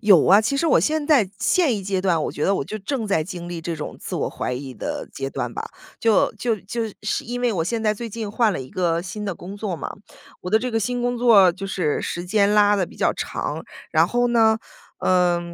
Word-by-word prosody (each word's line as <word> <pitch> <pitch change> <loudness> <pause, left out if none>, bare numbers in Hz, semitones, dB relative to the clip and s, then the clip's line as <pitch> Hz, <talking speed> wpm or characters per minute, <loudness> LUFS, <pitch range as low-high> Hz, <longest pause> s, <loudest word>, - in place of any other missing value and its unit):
有 195 -7 +6
啊， 200 +3 +7
其 230 +6 0
实 330 - +1
我 - - +5
现 310 -1 0
在 255 -11 +4
现 315 -11 +2
一 200 - -5
阶 190 -1 -1
段， 180 -4 +1
我 - - -3
觉 150 - -2
得 195 - +3
我 140 - -1
就 215 - -5
正 225 +2 -3
在 180 -6 +1
经 175 0 -7
历 170 -1 -5
这 165 0 -4
种 150 - -6
自 - - -5
我 - - -1
怀 - - -3
疑 130 +1 -5
的 - - -4
阶 135 0 -4
段 120 -2 -3
吧。 - - -4 0.4
就 225 -2 +3
就 225 0 -1
就 230 +4 -4 0.2
是 210 - -1
因 245 +1 -4
为 245 -2 +1
我 170 -4 0
现 225 +5 -2
在 215 -1 +3
最 235 +2 -6
近 220 -1 -5
换 220 -1 +2
了 - - -3
一 130 - -8
个 170 -2 0
新 210 +3 -6
的 195 -3 -2
工 190 +5 -9
作 200 -4 -3
嘛。 - - -5 0.5
我 180 - -6
的 220 - +5
这 250 +2 -3
个 225 0 0
新 245 +2 -1
工 245 0 0
作 205 -7 +6
就 195 +2 -6
是 180 -6 -1
时 175 +1 -4
间 200 +2 +2
拉 205 0 +5
得 190 -3 0
比 - - -15
较 - - +2
长， - - -4 0.3
然 - - +4
后 245 0 +1
呢， 225 -2 +4 0.4
呃， 180 -1 +2
205 Hz, 270 characters per minute, -22 LUFS, 180-230 Hz, 0.5 s, 啊